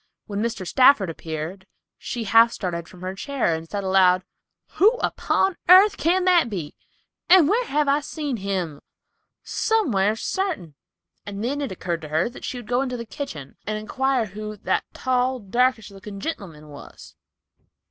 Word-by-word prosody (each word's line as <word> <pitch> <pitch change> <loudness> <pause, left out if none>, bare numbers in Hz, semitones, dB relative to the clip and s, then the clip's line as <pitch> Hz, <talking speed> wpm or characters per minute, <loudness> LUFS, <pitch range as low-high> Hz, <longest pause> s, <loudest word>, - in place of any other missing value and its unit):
When 205 -1 -4
Mr. 225 -4 -3
Stafford 235 -3 +4
appeared, 165 +4 -6 0.3
she 240 - -4
half 225 +3 +5
started 170 -6 -4
from 180 - -15
her 185 +1 -4
chair 250 - -1
and 160 0 -5
said 205 -1 -3
aloud, 185 -1 +4 0.6
"Who 425 +5 +6
upon 385 -6 0
airth 390 +3 +8
can 360 +3 +1
that 350 -8 +4
be, 170 -8 -5 0.6
and 355 -4 +7
whar 465 +8 +2
have 295 -4 0
I 280 +1 +3
seen 295 -3 -4
him? 185 -7 -3 0.6
Somewhar, 220 - +1
sartin." 315 - -3 0.5
It 200 -1 -6
then 265 +7 -2
occurred 185 - -3
to 155 - -7
her 160 +8 +1
that 245 - -13
she 255 - -4
would 240 -3 -9
go 245 +2 +1
to 250 -1 -4
the 235 - -6
kitchen 160 - -7
and 215 0 -1
inquire 260 +3 0
who 215 +1 -7
"that 205 - -1
tall, 255 0 0
darkish 230 +1 0
looking 200 +1 -9
gentleman 175 - -6
was." 145 -1 -12
215 Hz, 160 wpm, -23 LUFS, 185-275 Hz, 0.6 s, airth